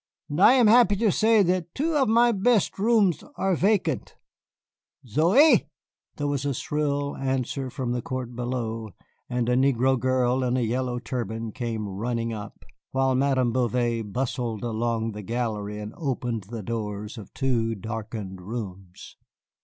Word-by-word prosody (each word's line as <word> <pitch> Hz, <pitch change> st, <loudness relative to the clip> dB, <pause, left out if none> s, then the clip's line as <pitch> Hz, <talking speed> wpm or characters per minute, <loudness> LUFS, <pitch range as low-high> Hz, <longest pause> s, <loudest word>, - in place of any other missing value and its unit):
And 150 Hz, +5 st, -1 dB
I 235 Hz, -, +8 dB
am 255 Hz, -3 st, +5 dB
happy 220 Hz, -2 st, +6 dB
to 210 Hz, 0 st, +2 dB
say 220 Hz, +2 st, +4 dB
that 180 Hz, -2 st, -1 dB
two 315 Hz, +3 st, 0 dB
of 270 Hz, -6 st, +3 dB
my 235 Hz, +2 st, +5 dB
best 210 Hz, -1 st, +2 dB
rooms 210 Hz, -5 st, +3 dB
are 190 Hz, +3 st, +1 dB
vacant. 180 Hz, -, 0 dB, 0.9 s
Zoey!" 170 Hz, -, +5 dB, 0.5 s
There 145 Hz, -, -3 dB
was 140 Hz, -2 st, -1 dB
a 140 Hz, -2 st, -1 dB
shrill 145 Hz, +1 st, -1 dB
answer 135 Hz, 0 st, -2 dB
from 125 Hz, -1 st, -3 dB
the 120 Hz, 0 st, -1 dB
court 125 Hz, -1 st, -5 dB
below, 115 Hz, -4 st, -4 dB, 0.3 s
and 120 Hz, -1 st, -1 dB
a 125 Hz, -, +2 dB
negro 130 Hz, 0 st, +3 dB
girl 130 Hz, 0 st, +1 dB
in 125 Hz, 0 st, +1 dB
a -, -, +1 dB
yellow 125 Hz, +2 st, -1 dB
turban 115 Hz, -1 st, -4 dB
came 110 Hz, -2 st, -3 dB
running 115 Hz, +4 st, -2 dB
up, 105 Hz, -2 st, -9 dB, 0.2 s
while 135 Hz, 0 st, +1 dB
Madame 130 Hz, -2 st, +2 dB
Bouvet 120 Hz, -3 st, 0 dB
bustled 120 Hz, -2 st, -2 dB
along 115 Hz, -1 st, -1 dB
the 105 Hz, 0 st, -7 dB
gallery 105 Hz, -1 st, -3 dB
and 105 Hz, +1 st, -7 dB
opened 125 Hz, -, -3 dB
the 110 Hz, +1 st, -7 dB
doors 105 Hz, 0 st, -4 dB
of 100 Hz, -, -11 dB
two 115 Hz, -4 st, 0 dB
darkened 105 Hz, -2 st, -6 dB
rooms. 95 Hz, -3 st, -8 dB
125 Hz, 155 wpm, -25 LUFS, 115-145 Hz, 0.9 s, I